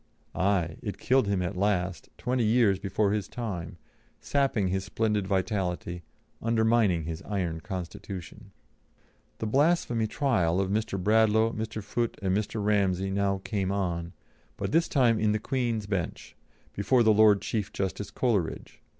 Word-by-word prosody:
Aye! 90 -4 0
it - - -5
killed 130 -4 +2
him 100 -2 0
at 90 +2 -3
last, 90 -2 -1
twenty 125 -1 0
years 110 -3 +3
before 100 0 0
his 105 -2 -1
time, 90 -8 -5 0.4
sapping 135 -9 +1
his 95 +1 -1
splendid 105 -1 -1
vitality, 90 -2 -1 0.4
undermining 110 -6 +2
his 80 0 -5
iron 90 -6 -2
constitution. 95 -1 -7 0.9
The - - -4
blasphemy 130 -3 +2
trial 95 - +1
of 95 0 0
Mr. 105 -1 -1
Bradlaugh, 110 +2 +3
Mr. 110 -1 -4
Foote, 115 +3 -2
and 95 -2 0
Mr. 105 0 -2
Ramsey 95 -2 +1
now 100 -1 0
came 100 -3 -1
on, 85 -3 -2 0.4
but - - -3
this 165 +2 +3
time 125 - +3
in 105 -1 +2
the 110 - 0
Queen's 115 -2 -1
Bench, 95 -5 -4 0.4
before 120 +5 +3
the 110 -1 +5
Lord 105 -1 +6
Chief 105 -3 -2
Justice 95 +1 -3
Coleridge. 105 -10 -2
100 Hz, 145 wpm, -28 LUFS, 95-110 Hz, 0.9 s, Lord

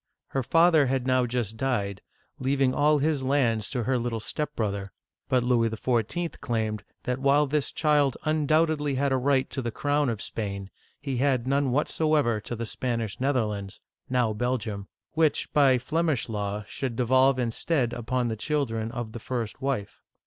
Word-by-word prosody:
^ - - -66 0.3
Her 135 - -1
father 165 +1 +4
had 130 -1 0
now 130 -1 +2
just 115 -3 -2
died, 100 -7 -1 0.4
leaving 135 0 +2
all 150 +2 +4
his 145 0 +1
lands 125 -6 +1
to 125 -3 -2
her 130 +1 +1
little 115 -1 -2
step 150 +6 -4
brother; 100 -3 -2 0.4
but 125 -2 +3
Louis 120 -2 +2
XIV. 120 +9 -1
claimed 110 -3 -2 0.2
that 125 0 -2
while 140 +2 +4
this 145 0 -1
child 150 -4 +2
undoubtedly 155 -1 +2
had 140 +1 +1
a 130 - +3
right 130 0 +2
to 135 - -3
the 120 - -2
crown 145 +3 0
of 115 -3 -2
Spain, 100 -3 -5 0.3
he 135 -3 -3
had 130 -2 +1
none 140 +1 +1
whatever 145 -3 +1
to 120 - -5
the 115 +1 -4
Spanish 115 -2 -3
Netherlands 110 -8 -1 0.3
(now 125 -4 +2
Belgium), 110 -4 -2 0.2
which 155 -1 +1
by 140 -3 +5
Flemish 155 +1 0
law 105 -2 -3
shoul.d 130 -1 -4
devolve 130 +2 +4
instead 125 +1 0
upon 120 +1 -1
the 110 - -2
children 115 -3 -1
of 120 -3 -5
the 115 - -7
first 120 0 -4
wife. 130 -7 -3
130 Hz, 170 wpm, -27 LUFS, 115-140 Hz, 0.4 s, by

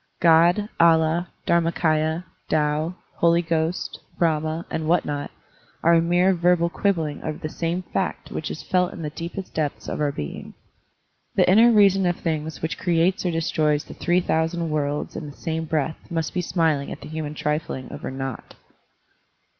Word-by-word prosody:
God, 170 +5 +5
Allah, 165 +1 +4 0.2
DharmaMya, 165 -1 +1 0.3
Tao, 155 +3 +1 0.2
Holy 170 0 +3
Ghost, 165 +1 -1 0.2
Brahma, 160 0 0
and 160 -1 -2
what 175 +1 +3
not, 145 -1 -3 0.5
are 170 - +5
a 165 - +5
mere 175 +3 +3
verbal 175 -1 +2
quib 200 +1 +1
bling 155 -3 -4
over 155 -1 -4
the 155 - -5
same 170 +3 -2
fact 185 +1 -3
which 155 - -4
is - - -6
felt 180 -1 +1
in 170 - -7
the 150 - -3
deepest 170 +4 -6
depths 150 -2 -2
of - - -3
our 145 -1 +1
being. 75 - -7 0.8
The - - +4
inner 225 +6 +7
reason 195 -3 +5
of 175 - +1
things 155 -2 -3
which 160 - -2
creates 180 +2 +1
or - - +2
destroys 155 -2 +1
the - - -11
three 175 +1 +1
thousand 165 0 0
worlds 145 -1 -2
in 150 - -5
the 145 - -13
same 160 0 -3
breath 155 0 -2
must 165 -2 -2
be 180 - 0
smiling 160 -5 0
at - - -7
the - - -8
human 155 -1 -5
trifling 150 -3 -2
over - - -6
naught. 135 -1 -6
165 Hz, 170 wpm, -24 LUFS, 155-175 Hz, 0.8 s, inner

